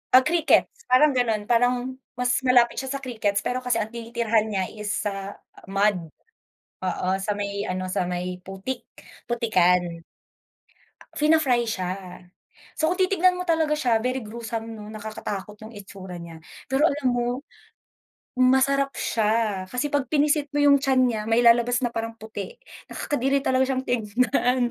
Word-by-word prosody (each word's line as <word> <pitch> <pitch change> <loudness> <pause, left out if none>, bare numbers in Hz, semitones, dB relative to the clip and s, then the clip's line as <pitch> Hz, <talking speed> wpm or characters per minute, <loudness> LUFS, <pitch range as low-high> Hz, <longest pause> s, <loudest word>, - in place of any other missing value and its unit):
Ah, 260 - +9
crickets, 335 -2 +2
parang 255 +4 +5
gano'n 225 -4 +1
parang 245 +2 +1 0.2
mas 245 0 +1
malapit 245 -2 +4
siya 265 - -3
sa 275 - -4
crickets 220 -6 -1
pero 250 - -2
kasi 235 -3 +1
ang 215 - -3
tinitirahan 230 -1 0
niya 200 -3 -1
is, 210 -1 -3
ah, 195 0 -6 0.3
mud, 195 -4 0 0.7
oo, 185 - -2
sa 195 +2 -2
may 200 0 -3
ano, 185 0 -3
sa 180 0 0
may 180 0 -3
putik, 195 +7 -6 0.4
putikan. 180 -7 +1 1.1
Fina-fry 300 -6 +3
siya. 185 -5 -2 0.9
So, 315 - +2
kung 375 - +1
titignan 370 -1 +3
mo 360 - -3
talaga 320 -3 +1
siya 245 -7 +2
very 255 +3 -2
gruesome 225 +1 -6
'no, 210 - -9
nakakatakot 210 -1 -6
yung 225 - -12
itsura 190 -3 -9
niya. 165 -1 -10 0.3
Pero 270 +4 +3
alam 285 -3 -1
mo, 245 +2 -1 1.0
masarap 265 +2 +3
siya 215 -3 0
kasi 250 +9 -2
pag 285 -2 0
pinisit 295 +1 +2
mo 290 - +2
yung 285 -1 +6
tiyan 265 -1 +2
niya 220 -2 -2
may 225 +2 +3
lalabas 240 +1 +4
na 245 - +1
parang 225 0 -4
puti, 220 - -8 0.3
nakakadiri 275 0 -1
talaga 260 -1 +2
siyang 260 -1 -1
tignan. 245 +1 +1
235 Hz, 150 wpm, -24 LUFS, 205-260 Hz, 1.1 s, Ah